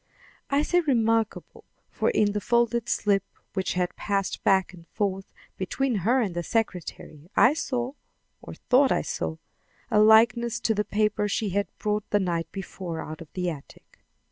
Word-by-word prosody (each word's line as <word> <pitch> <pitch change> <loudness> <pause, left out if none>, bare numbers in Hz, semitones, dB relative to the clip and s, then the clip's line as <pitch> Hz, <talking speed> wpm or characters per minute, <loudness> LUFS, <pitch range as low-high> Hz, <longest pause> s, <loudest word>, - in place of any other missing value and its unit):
I 280 +1 +2
say 355 +3 +2
remarkable; 225 -8 0 0.3
for - - 0
in 210 - +2
the 210 0 -2
folded 235 +1 +1
slip 200 -2 +2 0.3
which 190 -1 -1
had 180 0 -1
passed 200 -2 -2
back 190 -1 +3
and 170 -2 -15
forth 195 -3 -3 0.3
between 245 +6 -1
her 230 +8 +2
and 200 -6 -1
the 175 - -2
secretary, 175 -6 -3
I 250 - +6
saw, 255 -5 -2 0.5
or - - -9
thought 265 +1 +3
I - - +1
saw, 80 0 -3 0.5
a 210 - +4
likeness 225 +2 +5
to 225 - +2
the 210 0 0
paper 210 0 0
she 205 +1 -1
had 200 +2 0
brought 210 -1 -2
the 205 - +2
night 170 -3 -2
before 185 -3 -6
out 155 +1 -7
of 165 - -12
the 180 -2 -1
attic. 145 -3 -13
210 Hz, 170 wpm, -26 LUFS, 185-235 Hz, 0.5 s, I